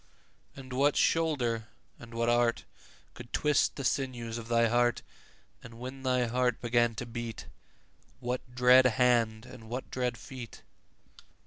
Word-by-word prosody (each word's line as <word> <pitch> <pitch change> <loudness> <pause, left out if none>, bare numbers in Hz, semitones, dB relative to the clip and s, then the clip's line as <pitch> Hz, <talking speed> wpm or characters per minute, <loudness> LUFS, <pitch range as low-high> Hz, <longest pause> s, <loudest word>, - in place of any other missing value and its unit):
And 130 -1 -9
what 140 +3 +2
shoulder 125 -9 +1 0.3
and 120 -1 -12
what 115 0 0
art 120 0 +2 0.5
Could 120 0 -11
twist 150 -2 +2
the 140 - -5
sinews 120 -4 -2
of 115 - -9
thy 115 0 +3
heart? 120 +1 +1 0.6
10 115 - -12
And 115 - -14
when 130 +2 -7
thy 125 -1 +1
heart 125 +1 0
began 120 -1 +1
to 125 - -5
beat, 120 -1 -6 0.7
What 125 0 -5
dread 125 +1 +6
hand 120 -2 +2
and 125 -3 -12
what 125 +2 -5
dread 125 -2 -2
feet? 125 -4 -10
120 Hz, 145 wpm, -30 LUFS, 115-130 Hz, 0.7 s, dread